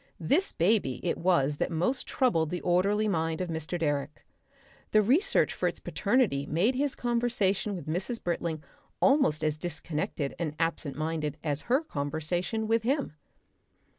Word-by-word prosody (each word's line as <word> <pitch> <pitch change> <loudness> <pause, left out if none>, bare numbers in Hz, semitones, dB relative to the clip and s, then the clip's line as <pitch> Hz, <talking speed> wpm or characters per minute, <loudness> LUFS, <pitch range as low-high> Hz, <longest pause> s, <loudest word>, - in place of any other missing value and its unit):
This 285 - +1
baby 170 - +1
it 175 - -1
was 150 -5 +2
that - - 0
most 180 +11 0
troubled 165 - +1
the 180 - -2
orderly 200 +5 +2
mind 165 -4 0
of 180 -1 -2
Mr. 160 +2 -3
Direck. 145 -2 -2 0.7
The 215 0 +6
research 275 - +3
for - - 0
its - - -3
paternity 200 - +1
made 180 - +2
his 275 +1 -1
conversation 235 -5 0
with 175 - -7
Mrs. 185 +9 -3
Britling 170 -2 -2 0.4
almost 270 - +3
as 155 0 0
disconnected 155 -3 -3
and 155 -3 -2
absent 165 -4 -1
minded 155 -1 -2
as 150 -2 -1
her 265 +6 +3
conversation 170 - -2
with 225 +1 +2
him. 265 - -1
175 Hz, 150 wpm, -29 LUFS, 155-220 Hz, 0.7 s, The